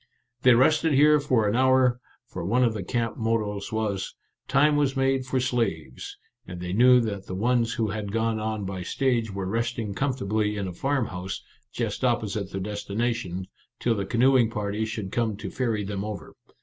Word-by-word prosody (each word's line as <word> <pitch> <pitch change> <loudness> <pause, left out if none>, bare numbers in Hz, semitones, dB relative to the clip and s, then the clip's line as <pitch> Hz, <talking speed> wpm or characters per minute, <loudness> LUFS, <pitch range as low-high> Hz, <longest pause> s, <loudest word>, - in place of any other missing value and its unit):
They 125 -2 +6
rested 155 +5 +3
here 150 +2 +6
for 130 -7 +1
an 105 - +1
hour, 130 -1 +4 0.3
for - - -7
one 120 +8 +2
of 115 -2 +2
the 105 - -4
camp 115 +4 -2
mottoes 110 -3 -1
was, 105 -3 -2 0.2
" - - -54
Time 150 +2 +5
was 140 -2 +1
made 135 -1 +1
for 130 0 0
slaves," 100 - -2 0.3
and 90 -1 -7
they 90 0 -4
knew 125 +4 +6
that 100 -4 -4
the 95 - -4
ones 115 +2 +1
who 110 -2 0
had 105 -1 -4
gone 115 0 0
on 110 -1 -3
by 95 -1 -4
stage 120 +3 0
were 95 -1 -4
resting 115 +1 -2
comfortably 105 -4 -1
in 100 -2 -2
a 90 - -5
farmhouse, 100 -6 -2 0.3
just - - -3
opposite 110 -5 0
their 95 - -4
destination, 105 -1 -3 0.3
till 120 - +1
the 100 -3 -3
canoeing 125 +1 +4
party 105 -1 -2
should 110 -3 -5
come 110 -3 -1
to 100 -2 -6
ferry 115 -5 -1
them 100 0 -4
over. 105 -1 -6
110 Hz, 185 wpm, -26 LUFS, 100-125 Hz, 0.3 s, They